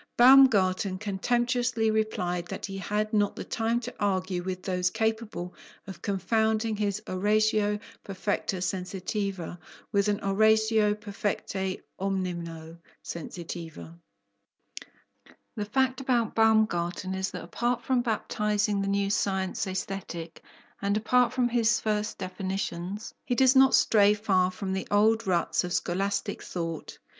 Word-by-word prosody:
Baumgarten 210 Hz, -7 st, +6 dB
contemptuously 240 Hz, +3 st, 0 dB
replied 180 Hz, -5 st, -1 dB
that -, -, -5 dB
he 195 Hz, -1 st, -6 dB
had 210 Hz, +2 st, -2 dB
not 205 Hz, -1 st, +2 dB
the -, -, -5 dB
time 230 Hz, +1 st, -1 dB
to 245 Hz, +1 st, -6 dB
argue 185 Hz, -3 st, 0 dB
with 185 Hz, 0 st, -5 dB
those 180 Hz, -1 st, 0 dB
capable 220 Hz, -4 st, -2 dB, 0.3 s
of 195 Hz, -4 st, -9 dB
confounding 220 Hz, +3 st, 0 dB
his 205 Hz, 0 st, -2 dB
oratio 210 Hz, +2 st, +2 dB, 0.3 s
perfecta 195 Hz, 0 st, -2 dB
sensitiva 185 Hz, -1 st, -3 dB, 0.3 s
with 200 Hz, 0 st, +2 dB
an 205 Hz, 0 st, +1 dB
oratio 220 Hz, +1 st, +3 dB
perfecte 200 Hz, -2 st, -3 dB, 0.2 s
(omnino!) 170 Hz, -4 st, -4 dB, 0.3 s
sensitiva. 170 Hz, -1 st, -7 dB, 1.6 s
The 210 Hz, -, -3 dB
fact 260 Hz, +4 st, 0 dB
about 240 Hz, -4 st, +1 dB
Baumgarten 205 Hz, -5 st, +2 dB
is 190 Hz, 0 st, -2 dB
that 180 Hz, -, -7 dB
apart 240 Hz, +8 st, -1 dB
from 255 Hz, -2 st, +2 dB
baptizing 210 Hz, -2 st, 0 dB
the 195 Hz, -, -2 dB
new 200 Hz, 0 st, +1 dB
science 190 Hz, -1 st, -1 dB
Aesthetic, 185 Hz, -3 st, -5 dB, 0.4 s
and 200 Hz, +1 st, +1 dB
apart 245 Hz, +2 st, +3 dB
from 250 Hz, -1 st, +1 dB
his 235 Hz, -1 st, +2 dB
first 210 Hz, -1 st, -1 dB
definitions, 190 Hz, +1 st, -4 dB
he 245 Hz, -, -1 dB
does 260 Hz, +1 st, +5 dB
not 265 Hz, 0 st, +7 dB
stray 210 Hz, -1 st, +5 dB
far 190 Hz, -4 st, +2 dB
from 190 Hz, +1 st, -4 dB
the 190 Hz, -, -3 dB
old 220 Hz, +1 st, +3 dB
ruts 175 Hz, -1 st, +1 dB
of 180 Hz, -, -4 dB
scholastic 195 Hz, +4 st, -1 dB
thought. 165 Hz, -2 st, -5 dB
205 Hz, 125 wpm, -28 LUFS, 185-220 Hz, 1.6 s, not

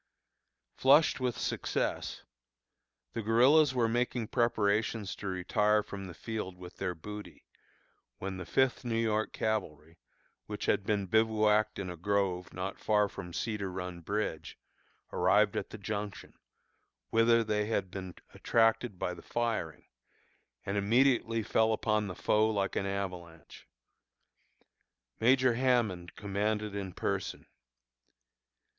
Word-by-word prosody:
Flushed 145 Hz, +4 st, +5 dB
with 125 Hz, -2 st, -1 dB
success, -, -, -2 dB, 0.9 s
the 115 Hz, -, -2 dB
guerillas 130 Hz, +6 st, +5 dB
were 120 Hz, -2 st, +3 dB
making 120 Hz, 0 st, -1 dB
preparations 110 Hz, -2 st, +1 dB
to 100 Hz, -, -7 dB
retire 105 Hz, +3 st, +2 dB
from 100 Hz, -1 st, -7 dB
the 85 Hz, -, -9 dB
field 105 Hz, -5 st, -5 dB
with 90 Hz, -1 st, -11 dB
their 90 Hz, -2 st, -2 dB
booty, 105 Hz, +5 st, -9 dB, 0.7 s
when 95 Hz, 0 st, -5 dB
the 90 Hz, -, -6 dB
Fifth 130 Hz, +4 st, +2 dB
New 115 Hz, -2 st, -1 dB
York 110 Hz, -1 st, 0 dB
Cavalry, 85 Hz, -7 st, -3 dB, 0.5 s
which -, -, -4 dB
had 100 Hz, -, +1 dB
been 105 Hz, -2 st, +1 dB
bivouacked 110 Hz, +1 st, +2 dB
in 100 Hz, -, -4 dB
a -, -, -6 dB
grove 90 Hz, 0 st, -1 dB
not 95 Hz, +1 st, -5 dB
far 105 Hz, -1 st, +2 dB
from 90 Hz, -3 st, -8 dB
Cedar 100 Hz, 0 st, -3 dB
Run 90 Hz, -1 st, -5 dB
Bridge, 100 Hz, -3 st, -3 dB, 0.6 s
arrived 105 Hz, -1 st, +3 dB
at -, -, -3 dB
the -, -, -8 dB
Junction, 105 Hz, -1 st, -5 dB, 0.8 s
whither 115 Hz, +1 st, +4 dB
they 105 Hz, -1 st, 0 dB
had 100 Hz, -4 st, -1 dB
been 95 Hz, -2 st, -7 dB, 0.2 s
attracted 115 Hz, -2 st, +2 dB
by 90 Hz, -, -2 dB
the 90 Hz, -, -10 dB
firing, 115 Hz, -9 st, -2 dB, 0.8 s
and 100 Hz, +1 st, -2 dB
immediately 115 Hz, +1 st, +3 dB
fell 110 Hz, +1 st, +2 dB
upon 105 Hz, -1 st, 0 dB
the 90 Hz, -, -6 dB
foe 110 Hz, +1 st, +2 dB
like 100 Hz, -3 st, -1 dB
an 100 Hz, -, 0 dB
avalanche. 90 Hz, -4 st, -6 dB, 1.5 s
Major 130 Hz, +1 st, +4 dB
Hammond 115 Hz, -8 st, +1 dB
commanded 105 Hz, +1 st, -2 dB
in 100 Hz, -2 st, -4 dB
person. -, -, -3 dB
105 Hz, 125 wpm, -31 LUFS, 95-115 Hz, 1.5 s, Flushed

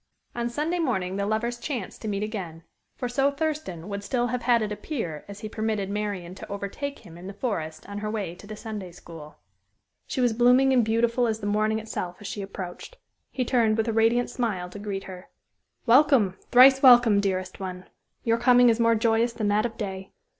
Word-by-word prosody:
On 235 Hz, 0 st, -2 dB
Sunday 310 Hz, +8 st, -2 dB
morning 195 Hz, -, -1 dB
the 200 Hz, 0 st, -1 dB
lovers 235 Hz, +3 st, -1 dB
"chanced" 240 Hz, -8 st, -5 dB
to -, -, -5 dB
meet 205 Hz, -1 st, -2 dB
again 180 Hz, -7 st, -6 dB, 0.3 s
for 250 Hz, -, -3 dB
so 270 Hz, +3 st, +2 dB
Thurston 280 Hz, -, -3 dB
would 200 Hz, 0 st, -5 dB
still 240 Hz, +3 st, 0 dB
have 250 Hz, +1 st, -2 dB
had 235 Hz, -2 st, +3 dB
it 210 Hz, -, -3 dB
appear 205 Hz, -, -4 dB
as 200 Hz, 0 st, -10 dB
he 215 Hz, -, -4 dB
permitted 215 Hz, -2 st, -2 dB
Marian 200 Hz, -4 st, -3 dB
to 190 Hz, -, -10 dB
overtake 200 Hz, +8 st, -5 dB
him 170 Hz, 0 st, -12 dB
in 180 Hz, -, -9 dB
the 200 Hz, -, -7 dB
forest 160 Hz, -10 st, -4 dB
on 200 Hz, 0 st, -6 dB
her 210 Hz, 0 st, -3 dB
way 205 Hz, -6 st, -3 dB
to 190 Hz, +3 st, -14 dB
the 215 Hz, -, -7 dB
Sunday 210 Hz, -4 st, -7 dB
school. 165 Hz, -3 st, -12 dB, 0.7 s
She -, -, -4 dB
was 245 Hz, -2 st, +3 dB
blooming 250 Hz, +3 st, +4 dB
and 250 Hz, -2 st, +4 dB
beautiful 230 Hz, +2 st, +1 dB
as 220 Hz, -1 st, -1 dB
the 205 Hz, -, -6 dB
morning 215 Hz, +1 st, +1 dB
itself 215 Hz, -5 st, -5 dB
as 205 Hz, -, -12 dB
she 205 Hz, -, -5 dB
approached. 195 Hz, -, -8 dB, 0.3 s
He 255 Hz, -, -2 dB
turned 230 Hz, -3 st, +2 dB
with 220 Hz, +1 st, 0 dB
a 225 Hz, -, 0 dB
radiant 225 Hz, +2 st, +2 dB
smile 190 Hz, -8 st, -2 dB
to 205 Hz, -, -8 dB
greet 200 Hz, -1 st, -4 dB
her. 185 Hz, -1 st, -10 dB, 0.6 s
"Welcome! 240 Hz, -6 st, +5 dB
thrice 265 Hz, +2 st, +7 dB
welcome, 240 Hz, -5 st, +7 dB
dearest 185 Hz, -2 st, -2 dB
one! 185 Hz, -1 st, -6 dB, 0.4 s
Your 230 Hz, 0 st, +1 dB
coming 245 Hz, 0 st, +6 dB
is 230 Hz, 0 st, +2 dB
more 230 Hz, 0 st, +4 dB
joyous 230 Hz, +1 st, +2 dB
than 215 Hz, -3 st, -1 dB
that 210 Hz, +3 st, +2 dB
of 225 Hz, -1 st, -14 dB
day. 190 Hz, -2 st, -6 dB
215 Hz, 205 wpm, -26 LUFS, 195-240 Hz, 0.7 s, thrice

